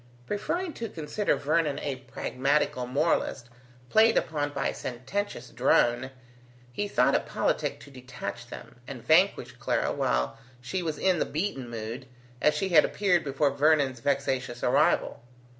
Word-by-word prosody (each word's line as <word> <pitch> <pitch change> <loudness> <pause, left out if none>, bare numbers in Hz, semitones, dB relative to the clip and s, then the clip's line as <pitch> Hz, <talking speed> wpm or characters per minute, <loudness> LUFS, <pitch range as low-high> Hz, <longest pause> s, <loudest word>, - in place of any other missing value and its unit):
Preferring 330 - -2
to 230 -1 -5
consider 165 +6 -1
Vernon 150 -1 0
a 140 -2 -3
pragmatical 130 0 -1
moralist 135 -2 0 0.4
played 225 +1 +5
upon 145 -2 0
by 145 - -1
a - - -4
sententious 130 +2 -4
drone, 120 +1 +2 0.6
he 205 +10 -2
thought 125 -10 +3
it - - +1
politic - - -1
to 140 - -13
detach 125 -3 -7
them, 120 - -11
and 125 -4 -8
vanquish 180 +7 +3
Clara - - 0
while 60 0 -1 0.2
she 155 +10 -3
was 160 -3 -3
in 185 -2 +2
the - - +1
beaten 150 -7 -3
mood, 115 +3 -6 0.3
as 150 - +4
she 195 - -1
had 160 -4 +7
appeared 180 -4 +1
before 140 0 +1
Vernon's 140 -3 +2
vexatious 130 -2 -1
arrival. 135 -1 +2
140 Hz, 145 wpm, -28 LUFS, 125-165 Hz, 0.6 s, had